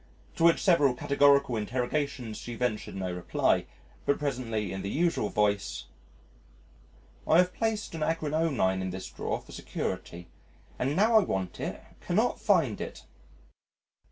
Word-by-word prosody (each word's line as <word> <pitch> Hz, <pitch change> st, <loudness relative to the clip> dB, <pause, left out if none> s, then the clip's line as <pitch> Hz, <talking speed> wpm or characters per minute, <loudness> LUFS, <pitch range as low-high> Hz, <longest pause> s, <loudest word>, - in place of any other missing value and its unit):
To -, -, 0 dB
which 170 Hz, 0 st, +6 dB
several 145 Hz, -9 st, +4 dB
categorical 140 Hz, -1 st, +3 dB
interrogations 125 Hz, +1 st, -2 dB
she 120 Hz, -, -6 dB
ventured 115 Hz, -4 st, -2 dB
no 95 Hz, -2 st, -3 dB
reply, 90 Hz, 0 st, +1 dB, 0.4 s
but 140 Hz, -, +3 dB
presently 115 Hz, -8 st, -2 dB
in 95 Hz, -, -4 dB
the 100 Hz, -, -4 dB
usual 165 Hz, -6 st, +1 dB
voice, 105 Hz, -1 st, 0 dB, 1.4 s
"I 160 Hz, -, +5 dB
have 180 Hz, 0 st, +4 dB
placed 220 Hz, -3 st, -2 dB
an 160 Hz, -, -5 dB
Agrionine 155 Hz, -11 st, +1 dB
in 95 Hz, -, -2 dB
this 95 Hz, +1 st, -6 dB
drawer -, -, -3 dB
for -, -, -16 dB
security 85 Hz, +1 st, -5 dB, 0.5 s
and, 135 Hz, +3 st, 0 dB
now 220 Hz, +5 st, +5 dB
I -, -, +2 dB
want 95 Hz, -, -3 dB
it, -, -, -4 dB, 0.2 s
cannot -, -, 0 dB
find -, -, +2 dB
it." -, -, -7 dB
130 Hz, 140 wpm, -29 LUFS, 105-160 Hz, 1.4 s, which